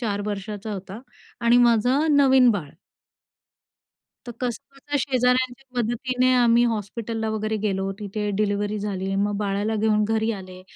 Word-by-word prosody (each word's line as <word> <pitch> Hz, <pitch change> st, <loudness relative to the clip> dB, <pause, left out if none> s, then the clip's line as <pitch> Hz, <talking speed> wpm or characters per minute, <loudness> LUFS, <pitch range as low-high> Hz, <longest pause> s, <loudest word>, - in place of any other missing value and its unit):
4 205 Hz, -4 st, -2 dB
वर्षाचा 210 Hz, +1 st, -5 dB
होता 195 Hz, +2 st, -7 dB, 0.4 s
आणि 235 Hz, 0 st, +4 dB
माझं 250 Hz, +6 st, +2 dB
नवीन 265 Hz, -3 st, +6 dB
बाळ. 175 Hz, -10 st, -3 dB, 1.5 s
तर 240 Hz, -, -6 dB
कसंबसं 275 Hz, +4 st, -4 dB
शेजाऱ्यांच्या 255 Hz, 0 st, 0 dB
मदतीने 250 Hz, +2 st, +1 dB
आम्ही 240 Hz, -1 st, +4 dB
हॉस्पिटलला 220 Hz, +1 st, -4 dB
वगैरे 220 Hz, 0 st, -2 dB
गेलो, 195 Hz, -2 st, -1 dB
तिथे 210 Hz, 0 st, -3 dB
डिलिव्हरी 205 Hz, 0 st, -1 dB
झाली. 195 Hz, -2 st, -3 dB
मग 205 Hz, +1 st, 0 dB
बाळाला 205 Hz, +1 st, -1 dB
घेऊन 215 Hz, 0 st, +2 dB
घरी 220 Hz, +1 st, +1 dB
आले. 185 Hz, -2 st, -9 dB
220 Hz, 130 wpm, -23 LUFS, 205-245 Hz, 1.5 s, नवीन